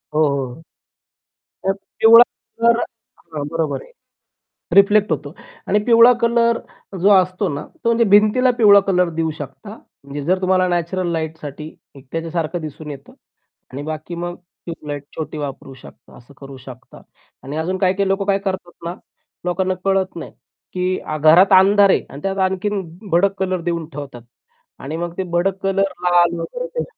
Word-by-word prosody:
हो, 155 Hz, -, +3 dB
हो. 140 Hz, 0 st, -3 dB, 1.1 s
तर 195 Hz, -, +3 dB
तेवढा 225 Hz, +4 st, +5 dB, 0.4 s
जर 235 Hz, 0 st, +5 dB, 0.6 s
हां, 145 Hz, -2 st, -3 dB
बरोबर 160 Hz, -2 st, -2 dB
आहे. -, -, -18 dB, 0.8 s
रिफ्लेक्ट 200 Hz, 0 st, +5 dB
होतो. 145 Hz, -1 st, -3 dB, 0.3 s
आणि 210 Hz, -, +2 dB
पिवळा 235 Hz, 0 st, +7 dB
कलर 235 Hz, 0 st, +2 dB, 0.4 s
जो 195 Hz, -, +4 dB
असतो 185 Hz, 0 st, +3 dB
ना, 140 Hz, -, -5 dB, 0.2 s
तो 230 Hz, -, +2 dB
म्हणजे 235 Hz, 0 st, +3 dB
भिंतीला 215 Hz, +5 st, +5 dB
पिवळा 205 Hz, -3 st, +7 dB
कलर 180 Hz, -2 st, +2 dB
देऊ 160 Hz, -1 st, 0 dB
शकता. 210 Hz, 0 st, -9 dB, 0.3 s
म्हणजे 140 Hz, +1 st, -6 dB
जर 185 Hz, +3 st, +1 dB
तुम्हाला 185 Hz, 0 st, +2 dB
नॅचरल 175 Hz, +1 st, -1 dB
लाईटसाठी 160 Hz, -2 st, -6 dB, 0.2 s
एकट्यासारखं 165 Hz, +4 st, -4 dB
दिसून 155 Hz, 0 st, -7 dB
येतं 140 Hz, -1 st, -12 dB, 0.6 s
आणि 135 Hz, -, -5 dB
बाकी 155 Hz, +2 st, -6 dB
मग 175 Hz, +1 st, -5 dB, 0.3 s
ट्यूब 165 Hz, -3 st, -8 dB
लाइट 145 Hz, -1 st, -4 dB
छोटी 155 Hz, -1 st, -5 dB
वापरू 140 Hz, -2 st, -6 dB
शकता, 130 Hz, -, -16 dB
असं 125 Hz, +4 st, -18 dB
करू 135 Hz, -1 st, -11 dB
शकता. 130 Hz, -1 st, -13 dB, 0.4 s
आणि 140 Hz, +3 st, -6 dB
अजून 175 Hz, +4 st, -2 dB
काही-काही 190 Hz, +1 st, +1 dB
लोक 195 Hz, +1 st, 0 dB
काय 195 Hz, -1 st, +3 dB
करतात 190 Hz, -3 st, -4 dB
ना, 170 Hz, -, -3 dB, 0.5 s
लोकांना 185 Hz, +1 st, 0 dB
कळत 195 Hz, -1 st, 0 dB
नाही, 165 Hz, -, -8 dB, 0.4 s
की 185 Hz, 0 st, -1 dB, 0.2 s
घरात 170 Hz, +6 st, +6 dB
अंधार 200 Hz, +1 st, +5 dB
आहे -, -, +2 dB
आणि 140 Hz, -, -10 dB
त्यात 195 Hz, +2 st, -2 dB
आणखीन 195 Hz, +2 st, -2 dB, 0.3 s
भडक 190 Hz, +4 st, +3 dB
कलर 185 Hz, -2 st, -1 dB
देऊन 170 Hz, -2 st, -3 dB
ठेवतात. 140 Hz, -5 st, -8 dB, 0.6 s
आणि 150 Hz, +4 st, -5 dB
मग 170 Hz, 0 st, -4 dB
ते 190 Hz, -, -1 dB
भडक 180 Hz, +3 st, 0 dB
कलर 195 Hz, 0 st, +1 dB
लाल 175 Hz, -1 st, +3 dB
वगैरे -, -, -5 dB
ते 485 Hz, -, -1 dB
180 Hz, 160 wpm, -19 LUFS, 155-195 Hz, 1.1 s, पिवळा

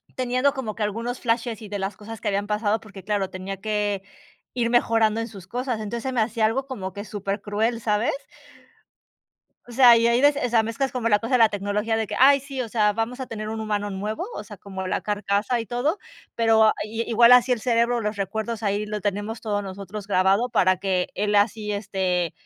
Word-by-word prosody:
teniendo 255 Hz, +2 st, +1 dB
como 240 Hz, -7 st, -4 dB
que 220 Hz, -, -2 dB
algunos 230 Hz, +4 st, -3 dB
flashes, 230 Hz, -2 st, -1 dB
y 210 Hz, -, -9 dB
de 205 Hz, -, -3 dB
las 195 Hz, 0 st, -4 dB
cosas 220 Hz, +1 st, -9 dB
que 215 Hz, -, -1 dB
habían 200 Hz, 0 st, -1 dB
pasado, 210 Hz, +1 st, 0 dB
porque, 200 Hz, -3 st, -12 dB
claro, 200 Hz, -1 st, -1 dB
tenía 190 Hz, +1 st, -6 dB
que 210 Hz, -2 st, -1 dB, 0.5 s
ir 235 Hz, -2 st, 0 dB
mejorando 225 Hz, -2 st, +3 dB
en 230 Hz, -, -3 dB
sus 195 Hz, -6 st, -11 dB
cosas. 245 Hz, +2 st, -3 dB
Entonces 225 Hz, +2 st, -4 dB
se 265 Hz, -, -2 dB
me 240 Hz, -, +2 dB
hacía 220 Hz, 0 st, +1 dB
algo 250 Hz, +5 st, 0 dB
como 195 Hz, -9 st, -6 dB
que 200 Hz, -, -6 dB
supercruel, 205 Hz, +3 st, -2 dB
¿sabes? 210 Hz, +1 st, +1 dB, 1.6 s
O -, -, -10 dB
sea, 245 Hz, -1 st, +8 dB
y 230 Hz, 0 st, +3 dB
ahí 235 Hz, +1 st, +3 dB
de, 290 Hz, -, +8 dB
o 285 Hz, -4 st, -1 dB
sea, 225 Hz, -1 st, +3 dB
mezclas 240 Hz, +5 st, -2 dB
como 245 Hz, -2 st, -1 dB
la 205 Hz, -, +5 dB
cosa 225 Hz, +5 st, -5 dB
de -, -, +5 dB
la 225 Hz, -2 st, +6 dB
tecnología 205 Hz, +2 st, -1 dB
de 220 Hz, -1 st, -1 dB
que, -, -, -5 dB
ay 275 Hz, +2 st, +6 dB
sí, 270 Hz, -1 st, -5 dB
o 230 Hz, -, -6 dB
sea, 210 Hz, -2 st, +2 dB
vamos 230 Hz, +4 st, -3 dB
a 260 Hz, -, -4 dB
tener 215 Hz, -2 st, -6 dB
un 220 Hz, 0 st, -4 dB
humano 205 Hz, -1 st, -2 dB
nuevo, 210 Hz, -, -3 dB
o -, -, -5 dB
sea, -, -, -11 dB
como 190 Hz, -2 st, -7 dB
la -, -, -1 dB
carcasa 205 Hz, +3 st, 0 dB
y 225 Hz, -, -6 dB
todo, 270 Hz, -, -1 dB, 0.4 s
pero 220 Hz, -1 st, +4 dB
i 225 Hz, +2 st, -3 dB
igual 235 Hz, +1 st, +6 dB
así 250 Hz, +1 st, +6 dB
el 240 Hz, -, -1 dB
cerebro, 235 Hz, 0 st, +1 dB
los 210 Hz, -1 st, -2 dB
recuerdos, 220 Hz, +3 st, -3 dB
ahí 205 Hz, +1 st, 0 dB
lo 210 Hz, 0 st, -4 dB
tenemos 205 Hz, +2 st, -3 dB
todos 205 Hz, -2 st, -1 dB
nosotros 200 Hz, +1 st, -7 dB
grabado 195 Hz, +4 st, +2 dB
para 185 Hz, -5 st, +3 dB
que 185 Hz, -1 st, 0 dB
él 205 Hz, +1 st, -1 dB
así, 210 Hz, +1 st, +1 dB
este, 185 Hz, -4 st, -1 dB
215 Hz, 220 wpm, -24 LUFS, 205-235 Hz, 1.6 s, sea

